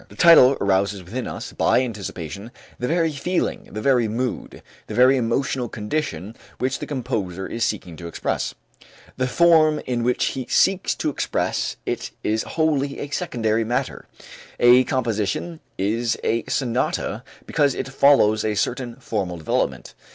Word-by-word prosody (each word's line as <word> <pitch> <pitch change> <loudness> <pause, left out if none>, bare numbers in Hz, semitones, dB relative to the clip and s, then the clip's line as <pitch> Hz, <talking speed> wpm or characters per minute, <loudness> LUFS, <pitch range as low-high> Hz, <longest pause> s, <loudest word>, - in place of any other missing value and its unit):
The - - -14
title 140 -6 +7
arouses 100 0 +1
within 120 +9 -5
us, - - -7
by 130 - +3
anticipation, 100 -3 -6 0.3
the 125 - -1
very 165 +1 +1
feeling, 170 +6 -2
the 110 - -5
very 125 -4 +3
mood, 120 +4 -4 0.2
the - - -6
very 130 +2 +6
emotional 125 0 -1
condition 105 - -4 0.2
which 130 +1 -1
the - - -6
composer 95 -9 -3
is 115 +3 -3
seeking 95 -7 -2
to 85 - -7
express. 85 - -3 0.6
The 130 0 0
form 155 +1 +4
in 125 -2 -1
which 125 +1 +1
he 130 -3 -5
seeks 195 -1 +2
to 155 - -1
express - - -1
it - - -3
is 110 +1 +1
wholly 145 -3 0
a 145 - -5
secondary 115 - 0
matter. 120 +3 -3 0.5
A 125 +1 +6
composition 120 - -2 0.2
is 115 +4 0
a 115 0 0
sonata 125 -2 -1 0.2
because 140 -3 +1
it - - -3
follows 135 -6 +4
a 110 -1 0
certain 120 +3 -2
formal 100 -8 -3
development. 80 - -2
120 Hz, 150 wpm, -22 LUFS, 105-140 Hz, 0.6 s, title